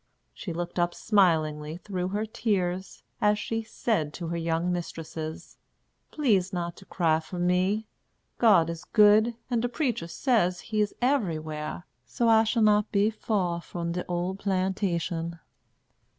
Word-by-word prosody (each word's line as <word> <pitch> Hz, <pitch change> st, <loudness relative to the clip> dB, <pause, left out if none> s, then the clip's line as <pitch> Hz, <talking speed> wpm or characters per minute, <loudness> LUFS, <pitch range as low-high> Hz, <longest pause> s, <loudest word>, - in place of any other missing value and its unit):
She 180 Hz, -, -6 dB
looked 175 Hz, +1 st, -4 dB
up 175 Hz, 0 st, +1 dB
smilingly 160 Hz, -7 st, +2 dB
through 185 Hz, -1 st, -3 dB
her 205 Hz, +3 st, -2 dB
tears, 195 Hz, -5 st, -2 dB, 0.2 s
as 210 Hz, 0 st, +4 dB
she 225 Hz, +2 st, -2 dB
said 215 Hz, -8 st, -2 dB
to 170 Hz, -3 st, -5 dB
her 170 Hz, -, -2 dB
young 165 Hz, +1 st, 0 dB
mistresses: 160 Hz, -2 st, -6 dB, 0.5 s
"Please 205 Hz, -11 st, +1 dB
not 175 Hz, -2 st, -3 dB
to 195 Hz, -, -14 dB
cry 160 Hz, -4 st, +1 dB
for 165 Hz, +3 st, -8 dB
me. 180 Hz, +5 st, +1 dB, 0.5 s
God 185 Hz, -8 st, +5 dB
is 165 Hz, -1 st, -7 dB
good, 215 Hz, +2 st, +5 dB, 0.2 s
and 235 Hz, -2 st, +2 dB
de 245 Hz, -, -1 dB
preacher 240 Hz, -, -1 dB
says 180 Hz, -4 st, +1 dB
he 215 Hz, -2 st, -1 dB
is 210 Hz, -, -1 dB
everywhar; 155 Hz, -, -1 dB, 0.2 s
so 235 Hz, -, -1 dB
I 225 Hz, 0 st, +6 dB
shall 225 Hz, +1 st, +2 dB
not 210 Hz, 0 st, +3 dB
be 205 Hz, +2 st, +3 dB
fur 190 Hz, -6 st, -1 dB
from 170 Hz, 0 st, -5 dB
de 180 Hz, +1 st, -2 dB
ole 175 Hz, +1 st, -1 dB
plantation." 185 Hz, -3 st, -1 dB
185 Hz, 150 wpm, -27 LUFS, 170-215 Hz, 0.5 s, I